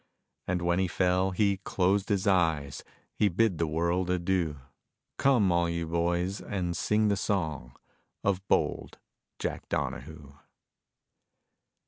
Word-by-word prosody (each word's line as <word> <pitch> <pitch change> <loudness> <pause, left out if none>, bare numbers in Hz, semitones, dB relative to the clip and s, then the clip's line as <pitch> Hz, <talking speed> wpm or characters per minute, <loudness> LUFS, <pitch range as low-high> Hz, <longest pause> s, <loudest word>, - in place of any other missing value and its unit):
And 90 -1 -1
when 85 +1 +2
he 95 - +2
fell, 90 +1 +1
he 100 +1 +1
closed 95 +1 0
his 100 -1 +1
eyes, 80 -8 +1 0.4
He 105 - +4
bid 100 -1 +1
the 85 - +1
world 85 +3 0
adieu; 90 -4 0 0.6
Come, 120 -9 +4
all 85 0 +2
you 85 0 -2
boys, 85 +3 -1
and 90 -4 -3
sing 105 +4 +2
the 100 - +2
song 80 -11 -2 0.5
Of 95 -2 +1
bold - - 0 0.4
Jack - - -4
Donahoo. 75 +1 -4
90 Hz, 125 wpm, -29 LUFS, 85-95 Hz, 0.6 s, He